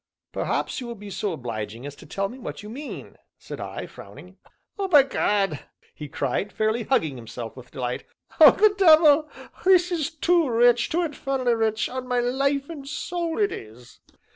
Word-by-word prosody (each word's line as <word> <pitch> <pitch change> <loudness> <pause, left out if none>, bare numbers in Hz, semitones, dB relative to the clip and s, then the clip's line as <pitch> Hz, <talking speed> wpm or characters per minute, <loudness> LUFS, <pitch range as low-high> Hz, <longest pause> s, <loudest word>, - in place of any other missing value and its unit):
"Perhaps - - -2
you 245 - -6
will 235 - -6
be 205 -1 -10
so 195 +2 -2
obliging 115 -4 -6
as 145 0 -7
to - - -14
tell 195 0 -2
me 250 +5 -11
what 235 - -7
you 210 - -9
mean?" 285 +5 -8 0.2
said - - -9
I, - - -6
frowning. - - -13 0.4
"Oh, 390 - 0
by 295 -7 +7
gad!" 200 - 0 0.3
he 150 - -8
cried, 140 +8 -2
fairly 220 +2 0
hugging 160 - +1
himself 115 -1 -8
with 125 -1 -12
delight. 125 -3 -4 0.3
"Oh, - - +11
the 430 -1 +4
devil! 310 -4 +6 0.3
this 365 -1 +4
is 320 -5 -1
too 335 -1 +2
rich 240 0 +4
too 345 +2 0
infernally 270 -5 -1
rich, 220 -1 0
on 255 0 -6
my 250 -1 +1
life 275 +3 0
and 290 -5 -9
soul 335 +2 -3
it 410 -2 +2
is!" 120 +3 -11
245 Hz, 180 wpm, -24 LUFS, -, 0.4 s, Oh